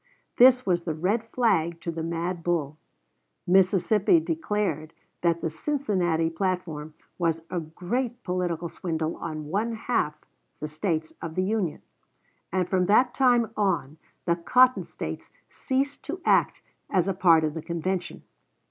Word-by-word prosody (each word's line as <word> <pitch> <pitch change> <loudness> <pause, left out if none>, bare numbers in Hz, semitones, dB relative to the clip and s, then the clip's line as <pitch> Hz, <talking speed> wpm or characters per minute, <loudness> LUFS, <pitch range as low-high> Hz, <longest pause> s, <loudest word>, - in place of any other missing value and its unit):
This 255 +1 +7
was 175 -2 +2
the 160 -3 -2
red 200 +8 0
flag 175 -10 +1
to 170 - -3
the 165 0 -5
mad 170 +2 -3
bull. 160 -3 -1 0.7
Mississippi 195 - +4
declared 210 - -2 0.3
that 170 -1 +1
the 165 - -1
Cincinnati 180 - 0
platform 165 -3 -3 0.2
was 165 -2 0
a 180 - -1
great 220 +10 -3
political 175 -2 -2
swindle 160 -1 -3
on 155 -2 -5
one 215 +7 0
half 225 -9 -1 0.4
the 150 - -3
States 155 +1 -2
of 160 -1 -6
the 185 - +1
Union; 195 -5 -1 0.7
and 185 -1 0
from 185 -1 +1
that 245 +5 +4
time 245 -4 +3
on 175 -8 0 0.3
the 170 -2 +2
Cotton 250 +9 +4
States - - -7 0.2
ceased 275 +1 -2
to 340 +5 -4
act - - +3 0.3
as 185 -1 +2
a 195 - +1
part 170 -3 +5
of 155 -1 0
the 160 - -5
convention. 175 +3 -3
180 Hz, 145 wpm, -26 LUFS, 165-215 Hz, 0.7 s, This